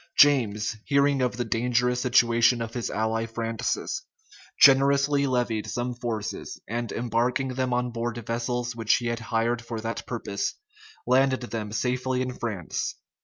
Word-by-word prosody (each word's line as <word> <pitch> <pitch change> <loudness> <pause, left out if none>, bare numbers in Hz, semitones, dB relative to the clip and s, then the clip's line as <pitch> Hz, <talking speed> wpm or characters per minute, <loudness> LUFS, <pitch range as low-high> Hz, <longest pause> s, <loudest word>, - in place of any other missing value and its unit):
James, 115 -6 +4
hearing 140 -1 +3
of 125 -1 0
the 120 - -1
dangerous 125 +2 +1
situation 120 -1 +4
of 115 -1 -4
his 120 -2 -3
ally 110 +1 -1
Francis, 115 -1 -2 0.6
generously 140 +1 +5
levied 120 -4 0
some 125 +1 -2
forces; 115 -3 -5
and 120 +1 -3
embarking 120 +3 0
them 130 0 -1
on 125 0 0
board 120 0 -3
vessels 120 +1 -2
which 115 -1 +2
he 120 - -3
had 115 0 -1
hired 115 +1 0
for 115 -1 -5
that 115 +1 -4
purpose, 105 -4 -3 0.5
landed 130 +1 +3
them 115 -4 -5
safely 125 +2 0
in 130 0 -4
France. 105 -9 -3
120 Hz, 145 wpm, -26 LUFS, 115-125 Hz, 0.6 s, generously